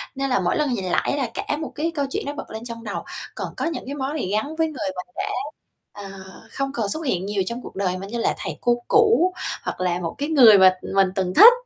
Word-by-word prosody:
Nên 275 Hz, 0 st, -1 dB
là 250 Hz, -, +2 dB
mỗi 180 Hz, -, +1 dB
lần 295 Hz, -4 st, +1 dB
nhìn 190 Hz, -5 st, -2 dB
lại 280 Hz, +9 st, 0 dB
là 255 Hz, -5 st, -1 dB
cả 290 Hz, -, -2 dB
một 315 Hz, -, -5 dB
cái 325 Hz, +3 st, -1 dB
câu 285 Hz, -, 0 dB
chuyện -, -, -2 dB
nó 285 Hz, -, -3 dB
bật 290 Hz, -, -8 dB
lên 220 Hz, +1 st, -6 dB
trong 230 Hz, -1 st, -7 dB
đầu. 210 Hz, -, -4 dB, 0.3 s
Còn -, -, -3 dB
có -, -, -1 dB
những 330 Hz, -, -3 dB
cái 280 Hz, +2 st, -5 dB
món 285 Hz, +3 st, -3 dB
gì 190 Hz, -6 st, -2 dB
gắn 220 Hz, +9 st, -1 dB
với 320 Hz, 0 st, +2 dB
người 260 Hz, -11 st, -4 dB
mà 180 Hz, -, -4 dB
đã, -, -, -2 dB, 0.6 s
ờ, 200 Hz, -1 st, -8 dB, 0.4 s
không 275 Hz, 0 st, -2 dB
còn 220 Hz, -6 st, -1 dB
xuất 315 Hz, +9 st, -3 dB
hiện 190 Hz, -8 st, 0 dB
nhiều 200 Hz, -1 st, 0 dB
trong 235 Hz, +1 st, -4 dB
cuộc -, -, -10 dB
đời 185 Hz, -2 st, -1 dB
mà 195 Hz, +1 st, -7 dB
như 235 Hz, +3 st, -4 dB
là -, -, +1 dB
thầy -, -, -5 dB
cô 240 Hz, 0 st, +3 dB
cũ, 420 Hz, -5 st, +4 dB, 0.3 s
hoặc -, -, -4 dB
là 180 Hz, -1 st, 0 dB
một 165 Hz, -2 st, -4 dB
cái 290 Hz, +2 st, -2 dB
người 240 Hz, -9 st, +8 dB
mà 185 Hz, -1 st, +7 dB, 0.2 s
mình 195 Hz, -1 st, +5 dB
từng 185 Hz, -1 st, -1 dB
thích. 475 Hz, +2 st, +11 dB
235 Hz, 270 wpm, -23 LUFS, 195-290 Hz, 0.6 s, thích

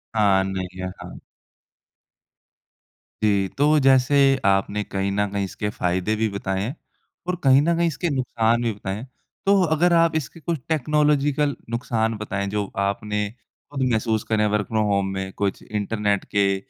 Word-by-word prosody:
हाँ, 100 Hz, -3 st, +4 dB
नहीं 95 Hz, -1 st, -5 dB
है। 95 Hz, -, -2 dB
हाँ। -, -, -9 dB, 2.0 s
जी, 100 Hz, -2 st, +2 dB
तो 150 Hz, +2 st, +4 dB
जैसे 135 Hz, 0 st, +4 dB, 0.3 s
आपने 100 Hz, +1 st, +1 dB
कहीं 100 Hz, -1 st, -2 dB
न 105 Hz, +1 st, 0 dB
कहीं 100 Hz, 0 st, -1 dB
इसके 105 Hz, +2 st, -4 dB
फ़ायदे 95 Hz, +1 st, -1 dB
भी 110 Hz, +1 st, +1 dB
बताएँ 95 Hz, -1 st, -3 dB
है। 125 Hz, +8 st, -4 dB, 0.5 s
और 180 Hz, -, 0 dB
कहीं 135 Hz, 0 st, +6 dB
न 170 Hz, +3 st, +2 dB
कहीं 170 Hz, 0 st, +2 dB
इसके 165 Hz, +2 st, -2 dB
नुकसान 120 Hz, -4 st, +1 dB
भी 115 Hz, -, +1 dB
बताएँ 100 Hz, -1 st, -5 dB
है। 110 Hz, -, -7 dB, 0.4 s
तो 200 Hz, 0 st, +4 dB
अगर 170 Hz, +1 st, +2 dB
आप 165 Hz, -1 st, +4 dB
इसकी 160 Hz, +1 st, -3 dB
कुछ 165 Hz, 0 st, -3 dB
टेक्नोलॉज़ीकल 150 Hz, -1 st, +2 dB
नुकसान 115 Hz, -1 st, -1 dB
बताएँ, 100 Hz, -1 st, -3 dB
जो 105 Hz, 0 st, -1 dB, 0.2 s
आपने 105 Hz, +1 st, -2 dB, 0.4 s
खुद 140 Hz, -2 st, -4 dB
महसूस 110 Hz, -1 st, 0 dB
करें 110 Hz, -1 st, 0 dB
हैं 105 Hz, -, +2 dB
वर्क 105 Hz, -1 st, 0 dB
फ्रॉम 110 Hz, -1 st, 0 dB
होम 100 Hz, -1 st, +1 dB
में, 95 Hz, 0 st, -4 dB
कुछ 100 Hz, -1 st, -2 dB
इंटरनेट 105 Hz, -1 st, -1 dB
के 100 Hz, -1 st, +3 dB
110 Hz, 165 wpm, -23 LUFS, 100-140 Hz, 2.0 s, कहीं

